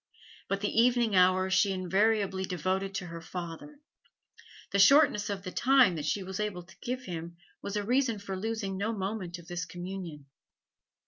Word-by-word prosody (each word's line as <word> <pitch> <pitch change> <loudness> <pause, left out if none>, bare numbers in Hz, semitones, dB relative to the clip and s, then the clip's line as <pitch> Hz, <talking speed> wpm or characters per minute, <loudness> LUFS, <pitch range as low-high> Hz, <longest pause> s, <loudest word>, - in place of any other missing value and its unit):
But 195 0 -2
the 210 +2 +2
evening 240 -3 +3
hours 185 +1 +4
she 195 +1 +4
invariably 190 +1 +1
devoted 190 +2 -2
to 185 - -3
her 170 -1 -8
father; 175 - -7 0.9
the 200 - +1
shortness 210 -1 +5
of 200 -2 -4
the 185 - -6
time 260 -5 +4
that 150 -2 -4
she 195 +5 -1
was 190 +1 -6
able 205 -4 -3
to 180 - -18
give 255 +1 -3
him 170 -4 -7 0.2
was 200 - -5
a 205 - 0
reason 245 0 +1
for 195 -1 -6
losing 200 -1 -3
no 215 +4 -1
moment 190 -3 -4
of 170 -1 -14
this 175 -1 -4
communion. 175 -4 -7
195 Hz, 175 wpm, -29 LUFS, 180-215 Hz, 0.9 s, shortness